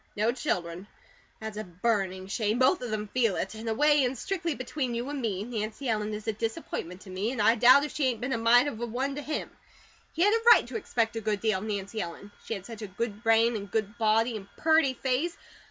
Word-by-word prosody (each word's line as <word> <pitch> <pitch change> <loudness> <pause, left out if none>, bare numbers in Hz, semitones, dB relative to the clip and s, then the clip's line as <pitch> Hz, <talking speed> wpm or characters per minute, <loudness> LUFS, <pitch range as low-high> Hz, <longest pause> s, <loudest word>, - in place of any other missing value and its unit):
No 215 +3 +2
children. 180 -6 -3 0.5
That's 220 -1 -6
a 215 - -3
burning 190 0 -1
shame! 210 +3 -1
Both 260 +8 +3
of 245 - -4
them 215 -1 -3
feel 230 -4 +1
it. 190 - -3
In 220 +1 -8
a 225 - +1
way, 295 +1 +4
and 255 +1 -1
strictly 335 - -2
between 255 -1 -3
you 240 +2 -3
and 290 -2 -4
me, 205 -4 -2
Nancy 220 +3 -4
Ellen 215 -2 0
is 210 +1 -8
a 220 - +1
disappointment 210 -4 -4
to 190 - -11
me, 195 +5 -2
an' 260 - -5
I 215 +2 +5
doubt 250 +4 +7
if 300 - -7
she 295 - 0
ain't 240 -4 -1
been 250 +3 -2
a - - 0
mite 235 +2 +5
of 240 -6 -5
a 240 - -2
one 260 +4 -2
to 290 - -5
him. 300 +1 -4 0.6
He 335 - +1
had 415 +2 +5
a 455 - +2
right - - +1
to - - -9
expect 230 - -1
a - - -3
good 210 -1 -1
deal 215 -3 +1
of 200 - -7
Nancy 205 +1 -3
Ellen. 175 +4 -7
She 225 - -3
had 195 -2 -8
such 230 -1 -9
a 210 - -5
good 210 +2 -4
brain, 225 0 +4
and 200 -2 -5
good 215 +1 -2
body, 225 +2 +2
and 200 -2 -7
purty 315 -5 +3
face. 270 +7 -1
225 Hz, 250 wpm, -28 LUFS, 210-255 Hz, 0.6 s, doubt